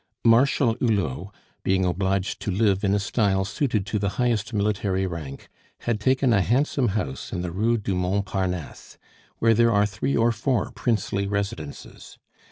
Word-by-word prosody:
Marshal 120 +1 +4
Hulot, 100 - -1 0.3
being 95 0 +2
obliged 95 +1 -1
to - - -3
live 100 0 +1
in 100 0 +2
a - - +1
style 100 -1 +1
suited 110 -2 -1
to 105 +1 -2
the 100 0 0
highest 120 -4 0
military 100 -3 0
rank, 80 -6 -6 0.3
had 115 -3 -1
taken 130 +2 +2
a 100 - +4
handsome 130 +4 +1
house 65 -10 -4
in 90 - -3
the 90 - -3
Rue 110 +6 +1
du 100 -2 -2
Mont 95 +2 0
Parnasse, 90 -4 -4 0.4
where 115 0 +4
there 115 +1 +4
are 105 -1 +3
three 105 +7 -1
or 115 +1 +3
four 115 +1 -1
princely 105 -4 -1
residences. 100 -7 -5
100 Hz, 165 wpm, -24 LUFS, 95-115 Hz, 0.4 s, Marshal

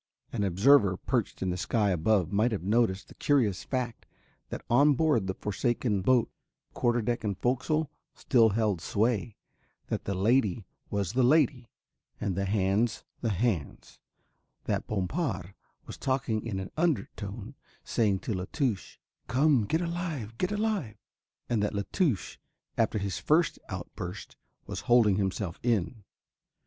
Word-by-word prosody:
An 110 -4 0
observer 100 +1 +4
perched 120 -5 -2
in 95 - 0
the 90 - -2
sky 105 +1 +1
above 90 +1 +2
might 110 +4 +2
have 105 -5 -3
noticed 100 -2 +1
the - - -14
curious 120 -11 +1
fact 125 -3 -3 0.4
that - - -6
on 140 +4 +5
board 145 -10 +2
the 95 - -2
forsaken 105 0 -1
boat 120 +3 +3 0.4
quarter 120 -1 +1
deck 120 +2 -1
and 100 -3 -2
fo'c'sle 130 +5 +1 0.3
still 115 -4 +4
held 105 -4 0
sway, 110 +3 0 0.5
that - - -2
the 100 - -2
lady 105 0 +2 0.2
was 100 -2 -2
the 130 - +2
lady 130 -2 +3 0.5
and 95 -3 -2
the 100 +1 -1
hands 100 +3 +1 0.2
the 115 - -1
hands, 100 - -2 0.6
that - - -2
Bompard 105 - -2 0.3
was - - -8
talking 130 -5 -1
in 100 -4 -3
an 95 - -6
undertone, 115 - -2 0.3
saying 100 -5 +1
to 110 - -3
La 90 -1 -3
Touche: 125 -10 -2 0.3
"Come, 135 -2 +3
get 160 - 0
alive, 165 - -3
get 185 - 0
alive," 210 - -1 0.5
and 115 -3 0
that 105 0 -1
La 100 - 0
Touche, 145 - 0 0.4
after 110 -1 +1
his 100 -3 -2
first 160 +2 +2
outburst, 90 +2 -7 0.3
was - - -5
holding 115 -5 +5
himself 95 -2 -2
in. 115 -1 0
110 Hz, 145 wpm, -29 LUFS, 100-130 Hz, 0.6 s, on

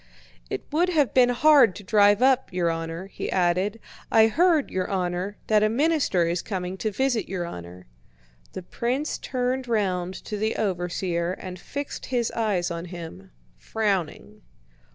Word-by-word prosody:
"It - - -4
would 340 +5 +2
have 300 -7 +2
been 250 -1 +5
hard 260 -4 +5
to 205 - -9
drive 205 +3 +4
up, 265 -1 +3
your 175 -2 0
honor," 165 +2 -5
he 195 - -6
added. 185 +4 +1 0.3
"I 220 -1 +6
heard, 320 +2 +2
your 185 -1 -2
honor, 185 +1 -2
that 215 -1 +3
a 215 - +3
minister 275 - +2
is 170 +1 -1
coming 185 -3 -4
to 215 - -1
visit 245 +1 -1
your 180 -2 -3
honor." 90 - -9 0.7
The 185 - -6
prince 250 - -2
turned 255 0 -2
round 190 -5 -1
to 210 - -4
the 220 +2 -1
overseer 175 -2 -1
and 185 -1 -8
fixed 285 +9 -6
his 240 -3 0
eyes 200 -6 -1
on 170 0 -4
him, 165 - -9 0.3
frowning. 195 - -2
200 Hz, 155 wpm, -25 LUFS, 175-245 Hz, 0.7 s, I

